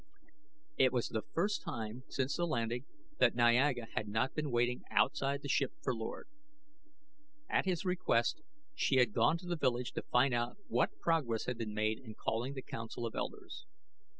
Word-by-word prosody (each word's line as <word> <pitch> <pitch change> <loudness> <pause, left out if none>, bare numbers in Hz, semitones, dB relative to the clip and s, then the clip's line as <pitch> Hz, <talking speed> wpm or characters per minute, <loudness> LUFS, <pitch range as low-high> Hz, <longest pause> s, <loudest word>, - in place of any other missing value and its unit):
It 130 -1 +6
was 125 -2 0
the 110 - -1
first 170 - -1
time 110 +1 -5
since 130 +1 -1
the 175 0 0
landing 120 -2 -1 0.3
that - - +5
Niaga 120 +1 +4
had 105 - -2
not 110 +5 0
been 150 -2 -2
waiting 120 0 +1
outside 140 +1 +2
the - - -4
ship 135 -1 +1
for 130 - +1
Lord. 115 - -5 1.2
At - - +1
his 185 0 0
request 180 - +1 0.3
she 295 - +1
had 125 -5 +4
gone 165 - +4
to 180 - -12
the 175 - 0
village 125 -5 0
to - - -3
find 125 +1 +3 0.3
what - - +1
progress 140 -10 +1
had 125 -2 -3
been 105 -2 -3
made 110 +1 +1
in 110 -5 -10
calling 120 +6 -2
the 130 - -5
council 115 +1 -5
of 115 - -4
elders. 390 -3 -5
125 Hz, 175 wpm, -34 LUFS, 115-145 Hz, 1.2 s, It